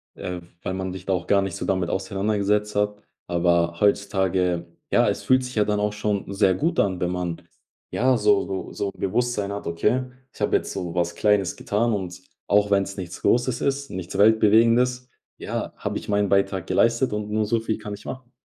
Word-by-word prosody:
äh, 90 -1 -5 0.2
weil 95 - -3
man 95 -1 -3
sich 95 -1 -8
da 95 - -2
auch 85 -1 -2
gar 100 -1 +4
nicht 95 -3 -3
so - - -4
damit 95 -3 0
auseinandergesetzt 105 +1 0
hat. 105 0 0 0.3
Aber 85 0 +1
heutzutage, 95 -4 +1 0.3
ja, - - +4
es - - -3
fühlt 130 0 +3
sich 125 -1 -7
ja 105 - +3
dann 105 -1 0
auch 105 0 +1
schon 105 -2 -2
sehr 95 -2 +3
gut 165 - 0
an, 95 -3 +1
wenn 90 0 0
man 90 -2 -3 0.5
ja 130 +1 +2
so 105 -2 +3
so 95 -1 -4
so 100 -1 -3
Bewusstsein 105 0 -1
hat, 100 -3 -5
okay, 105 +10 +1 0.3
ich - - -17
habe - - +2
jetzt - - 0
so 85 -1 -5
was 85 -1 0
Kleines 105 -4 +2
getan 115 +3 0
und 90 -2 -4 0.3
auch 105 0 +3
wenn's 100 0 +1
nichts 90 -1 -7
Großes 125 0 +2
ist, 140 0 -1
nichts 95 +1 -5
Weltbewegendes, 115 +4 +4 0.3
ja, - - -4
habe - - -3
ich - - -8
meinen 100 -1 +1
Beitrag 100 -2 +1
geleistet 115 +2 +2
und 105 0 -3
nur 110 0 0
so 115 +2 +1
viel 110 -1 -2
kann 105 -1 -7
ich 100 - -10
machen. 130 -1 -8
100 Hz, 200 wpm, -24 LUFS, 95-110 Hz, 0.5 s, gar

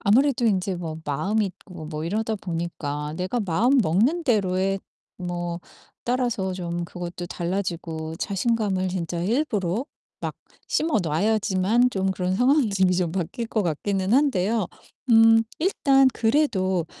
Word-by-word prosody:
아무래도 245 +3 +3
인제 190 -3 +1
뭐 165 -3 -5
마음이 190 +10 0
있고 180 -3 -10
뭐 155 0 -5
이러다 215 +5 -1
보니까 160 -5 -4
내가 185 +7 -1
마음 225 +8 +2
먹는 230 - +2
대로의 195 -5 +1 0.4
뭐 175 -1 -3 0.5
따라서 240 -6 0
좀 175 -1 -3
그것도 175 0 -6
달라지고 170 -3 -3
자신감을 200 -1 0
진짜 170 -2 -3
일부러 215 - 0 0.4
막 - - -3 0.3
심어 310 -6 +1
놔야지만 205 +6 +2
좀 190 -3 0
그런 185 0 -1
상황이 255 0 +3
좀 190 -1 +3
이 - - +3
좀 175 -2 0
바뀔 190 +6 -3
것 220 -2 0
같기는 190 +5 0
한데요. 225 -7 +2 0.4
음 225 0 +7 0.2
일단 275 -6 +4
그래도 210 - +1
190 Hz, 280 characters per minute, -24 LUFS, 175-225 Hz, 0.5 s, 음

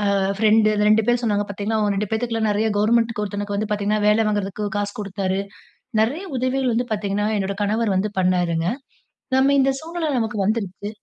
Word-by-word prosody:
ஆ - - +2 0.2
friend, 215 0 +4
அந்த 210 0 +1
2 215 0 +4
பேர் 240 0 +2
சொன்னாங்க 205 -2 +1
பாத்தீங்களா 210 +2 -2
அவுங்க 205 -1 +1
2 205 0 -2
பேத்துக்கெல்லாம் 225 -1 0
நெறைய 215 +2 +1
கவர்ன்மென்ட்க்கு 230 +1 +2
ஒருத்தனுக்கு 205 0 -4
வந்து 215 +1 -2
பாத்தீங்கன்னா, 210 0 0
வேல 215 +1 +4
வாங்குறதுக்கு 205 0 -2
காசு 205 0 -2
குடுத்தாரு. 195 -1 -2 0.6
நெறைய 285 - 0
உதவிகள் 255 0 0
வந்து 245 +1 0
பாத்தீங்கன்னா, 205 0 -1
என்னோட 195 0 -2
கணவர் 210 -1 0
வந்து 205 +2 -1
பண்ணாருங்க. 175 -2 +1 0.7
நம்ம 275 +1 +4
இந்த 270 - +3
சூழ்நிலை 330 0 -4
நமக்கு 220 -2 -2
வந்துருச்சு. 205 -2 -2
210 Hz, 175 wpm, -22 LUFS, 200-225 Hz, 0.7 s, friend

